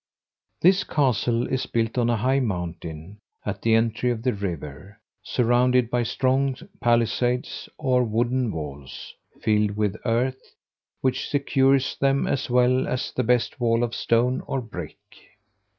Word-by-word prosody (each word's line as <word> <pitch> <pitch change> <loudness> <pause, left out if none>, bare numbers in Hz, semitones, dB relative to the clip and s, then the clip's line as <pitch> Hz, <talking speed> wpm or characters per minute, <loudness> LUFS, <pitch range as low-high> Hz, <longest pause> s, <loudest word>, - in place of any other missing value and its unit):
This 190 +3 +5
castle 120 -4 +1
is 130 - -2
built 115 -1 -1
on 120 -2 +1
a 120 - +2
high 130 +5 +2
mountain, 90 - -5 0.3
at 100 -1 -4
the 115 -1 +3
entry 115 +2 +1
of 115 -2 -2
the 125 - +1
river, 95 0 -6 0.2
surrounded 125 0 +2
by 125 - +1
strong 130 +2 +1 0.2
palisades, 120 +1 0
or 130 -4 +2
wooden 120 +1 0
walls, 70 -5 -7 0.3
filled 105 -2 +1
with 105 -2 0
earth, 125 +3 -1 0.5
which 130 0 -1
secures 135 -1 +2
them 135 0 +2
as 135 - -1
well 125 +1 +3
as 125 - -2
the - - -1
best 125 +2 +1
wall 115 -1 +2
of 120 -1 -2
stone 120 +3 +1
or 135 - -1
brick. 115 -4 -8
120 Hz, 140 wpm, -24 LUFS, 110-130 Hz, 0.5 s, This